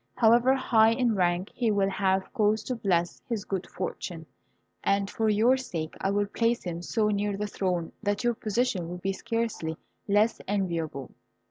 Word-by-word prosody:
However 240 +3 +5
high 225 -4 +4
in 240 -1 +1
rank, 180 0 0
he 240 -2 0
will 200 -2 +2
have 190 -1 0
cause 215 -2 +2
to 255 - -3
bless 180 -6 0
his 220 -4 -2
good 190 -3 -3
fortune, 175 -2 -5 0.6
and 200 0 +2
for 220 +2 0
your 225 +5 +4
sake 165 -11 -5
I 195 - +1
will 205 +1 +1
place 230 +3 0
him 170 -2 -4
so 210 +4 0
near 205 -1 0
the 210 - -2
throne 180 -4 -2
that 205 +1 -1
your 240 0 +2
position 215 -5 -1
will 180 - -5
be 195 +2 -2
scarcely 225 -7 -2 0.3
less 210 +3 +2
enviable." 165 -9 -2
205 Hz, 170 wpm, -28 LUFS, 185-225 Hz, 0.6 s, However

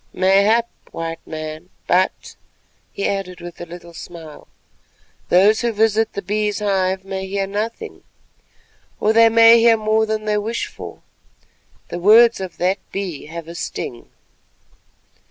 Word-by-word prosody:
"Mayhap, 200 +5 +3 0.2
White 165 0 -5
Man, 155 +2 -7 0.2
but," 185 +2 0 0.6
he 200 - -2
added 190 -3 -4
with 175 0 -10
a 175 - -7
little 170 0 -11
smile, 165 -2 -11 0.8
"those 205 +5 +4
who 235 -1 0
visit 220 0 +1
the 200 - -5
Bee's 210 +2 -1
hive 190 -2 -1
may 190 0 -5
hear 195 0 -2
nothing, 220 - -5 1.0
or 215 - +2
they 230 0 +6
may 230 +1 +7
hear 230 0 +5
more 220 0 +1
than 215 0 -2
they 210 -1 +1
wish 225 +3 -3
for. - - -11 0.9
The 175 - -5
words 225 +5 +6
of 190 -2 -7
that 185 +3 0
Bee 185 -8 -5
have 165 0 -8
a 170 - -8
sting." 120 -7 -6
195 Hz, 140 wpm, -20 LUFS, 175-220 Hz, 1.0 s, may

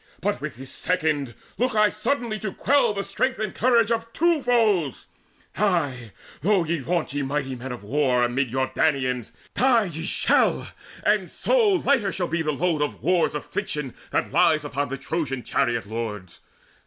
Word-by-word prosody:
But - - -1
with - - -5
this 130 +2 -8
second 150 -8 -1 0.2
look 250 -1 +1
I 215 -1 +5
suddenly 230 0 -2
To 195 -1 -3
quell 260 +2 +2
the 200 -1 -3
strength 255 +7 -1
and 215 -2 -3
courage 235 -2 +3
of 230 0 -1
two 335 -2 +2
foes, 215 - +1 0.5
Ay, 145 - 0 0.3
though 195 +2 +3
ye 165 0 -1
vaunt 165 +3 -2
you 145 0 -1
mighty 135 -1 -2
men 130 +1 -6
of 120 -4 -7
war 125 +1 +2
Amid 125 +2 0
your 130 +2 0
Danaans! 130 -6 0 0.2
Die 240 -1 +4
ye 165 -4 -5
shall, - - +2 0.4
and - - +2
so 460 -5 +2
Lighter 270 - +2
shall 180 -2 -2
be 170 0 -1
the 155 -1 0
load 155 +1 0
of 150 - -3
war's 175 -4 +2
affliction 145 -2 -3 0.2
That - - -1
lies 155 -2 +3
upon 145 -1 -2
the 135 - -4
Trojan 135 -3 -3
chariot 120 -5 0
lords. 105 -4 -6
160 Hz, 170 wpm, -24 LUFS, 135-215 Hz, 0.5 s, I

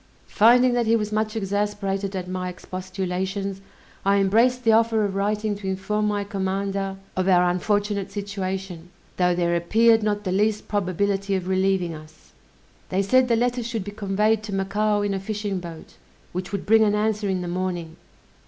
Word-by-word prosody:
Finding 245 +3 +5
that 240 -2 +1
he 225 - +4
was 210 -2 -1
much 215 +1 -1
exasperated 200 -1 -2
at 180 -1 -4
my 185 0 -3
expostulations, 190 +2 -4 0.4
I 200 +1 +3
embraced 230 +6 +3
the 225 - +4
offer 225 -1 +3
of 200 - -2
writing 210 +2 -1
to 200 -1 -7
inform 195 +3 -1
my 205 -1 0
commander 195 0 -2 0.2
of 185 0 0
our 180 -1 +5
unfortunate 200 +2 0
situation, 190 -3 -5 0.3
though 180 -1 +2
there 175 -1 +1
appeared 225 +6 +4
not 210 -1 -1
the 185 - -2
least 210 +2 +1
probability 200 0 0
of 185 -1 -3
relieving 190 -2 +1
us. 155 - -14 0.6
They 190 +2 +1
said 255 +5 +4
the 235 - +3
letter 245 +1 0
should 230 -3 -3
be 205 - -7
conveyed 210 +1 +1
to 210 -2 -5
Macao 205 +2 0
in 205 -1 0
a 195 - -2
fishing 205 -1 -3
boat, 170 -2 -10 0.3
which 180 +1 -5
would 200 -2 -3
bring 220 +1 +5
an 210 -1 +2
answer 210 -1 0
in 185 -1 -1
the - - -4
morning. 175 -2 -3
200 Hz, 175 wpm, -24 LUFS, 185-215 Hz, 0.6 s, Finding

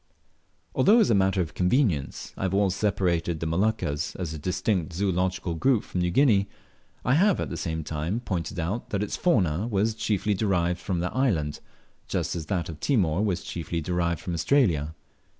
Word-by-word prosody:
Although 215 +4 +5
as 220 - +4
a - - +5
matter 95 -1 +2
of 80 - -4
convenience 90 - 0
I - - -9
have 95 0 0
always 100 -2 +2
separated 90 -5 0
the 80 - -3
Moluccas 80 -3 -1
as 85 -4 -4
a 80 - -6
distinct 90 0 -1
zoological 90 -1 -1
group 115 +7 +2
from 90 - -3
New 90 - +1
Guinea, 100 -2 +3 0.6
I 125 - +3
have 190 +5 +4
at - - -3
the - - -3
same 80 -2 -3
time 80 +8 -2
pointed 95 -5 -3
out 95 +9 -3
that 100 0 -1
its 105 - -3
fauna 100 - +1
was 110 0 +1
chiefly 105 -1 0
derived 90 -4 0
from 90 -2 -2
that 90 - -3
island, 85 - 0 0.5
just - - -2
as 80 -3 -5
that 90 -4 -1
of 80 -2 -8
Timor 95 - +1
was 95 -5 -1
chiefly 85 0 -4
derived 85 0 -1
from 90 -3 -4
Australia. 85 - +2
90 Hz, 185 wpm, -26 LUFS, 85-105 Hz, 0.6 s, Although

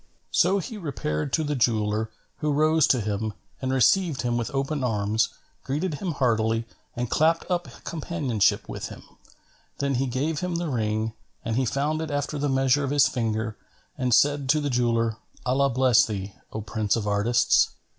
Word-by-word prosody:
So 185 +3 +3
he 210 +3 -5
repaired 130 - -3
to 160 - +2
the 150 -1 -1
jeweller, 110 -3 +1 0.3
who 150 -1 -1
rose 155 +1 +4
to 125 - +3
him 105 +1 -2 0.3
and 130 -1 -1
received 140 - +3
him 120 -1 0
with 120 -1 -1
open 135 +1 -1
arms, 105 -2 +1 0.3
greeted 155 +6 -2
him 180 -4 -1
heartily 115 -4 +1 0.3
and 120 +1 -2
clapped 160 +6 +2
up 175 -1 0 0.2
companionship 145 - 0
with - - -5
him. - - -11 0.7
Then 140 -1 0
he 135 +1 0
gave 145 +5 -1
him 180 -1 -2
the 170 -1 -2
ring, 110 -2 -1 0.3
and 115 -1 -1
he 130 +1 +2
found 145 +6 0
it 160 - -4
after 145 0 -2
the 145 0 0
measure 135 +1 +3
of 135 - -1
his 145 -1 +4
finger 110 -2 -2 0.4
and 125 -1 -1
said 140 +2 +3
to 155 +2 +4
the 145 -2 -1
jeweller, 115 -2 +1 0.3
"Allah 135 +2 +2
bless 130 -2 +4
thee, 100 -2 -4 0.2
O 110 - -4
prince 110 -1 0
of 115 -3 -2
artists! 105 +4 +3
130 Hz, 175 wpm, -25 LUFS, 110-145 Hz, 0.7 s, rose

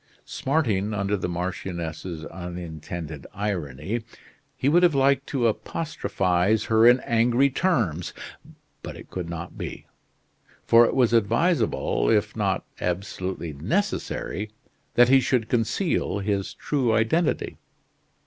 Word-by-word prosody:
Smarting 110 -8 0
under 100 +1 0
the 90 -2 -3
marchioness's 85 -2 -4
unintended 85 -3 -7
irony, 95 - -3 0.6
he 130 - 0
would 170 +5 +5
have 175 -4 +4
liked 135 0 +3
to 130 -4 0
apostrophize 110 - 0
her 110 +1 +5
in 125 +1 +7
angry 120 +4 +3
terms; 115 - 0 0.7
but - - -7
it - - -13
could 90 -2 -4
not 85 0 -7
be, - - -6 0.8
for 115 +1 +7
it - - -2
was 125 -3 +3
advisable 115 - +2
if - - +2
not - - 0
absolutely 90 -2 -3
necessary 105 - -2 0.5
that 120 0 +6
he 135 0 +7
should 125 -3 +1
conceal 120 - 0
his 100 -1 -2
true 130 -6 0
identity. 150 +10 +1
105 Hz, 120 wpm, -25 LUFS, 90-125 Hz, 0.8 s, in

